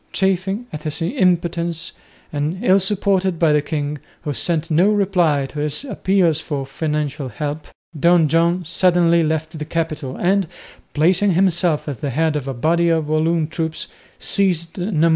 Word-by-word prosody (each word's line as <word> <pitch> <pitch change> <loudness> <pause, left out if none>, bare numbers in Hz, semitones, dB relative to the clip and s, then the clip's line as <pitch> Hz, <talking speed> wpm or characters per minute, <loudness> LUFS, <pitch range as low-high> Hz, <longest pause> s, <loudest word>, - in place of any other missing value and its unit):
Chafing 195 +4 0
at 155 - -5
his 155 0 -3
impotence, 170 - 0 0.4
and 150 +4 -2
ill 190 +1 +5
supported 190 -2 +1
by 160 -2 +3
the 150 - +3
king, 145 -1 -3 0.2
who 145 - -2
sent 165 +3 -1
no 175 +6 +4
reply 180 -9 +2
to 145 +2 -7
his 150 - +1
appeals 185 - +1
for 140 -4 -4
financial 150 -1 -3
help, 150 +2 -5 0.3
Don 170 0 +4
John 170 +3 +1
suddenly 170 0 +3
left 160 0 -2
the - - -3
capital 155 -4 -3
and, 190 0 +1 0.5
placing 185 +5 +3
himself 175 -3 +1
at 140 -7 -5
the 145 - -2
head 155 +4 0
of 140 -2 -3
a 135 - -2
body 170 +7 +2
of 160 -2 +1
Walloon 160 +1 +1
troops, 160 0 -4 0.3
seized 180 -3 +1
Namur. 170 -3 +1
165 Hz, 160 wpm, -20 LUFS, 150-180 Hz, 0.5 s, ill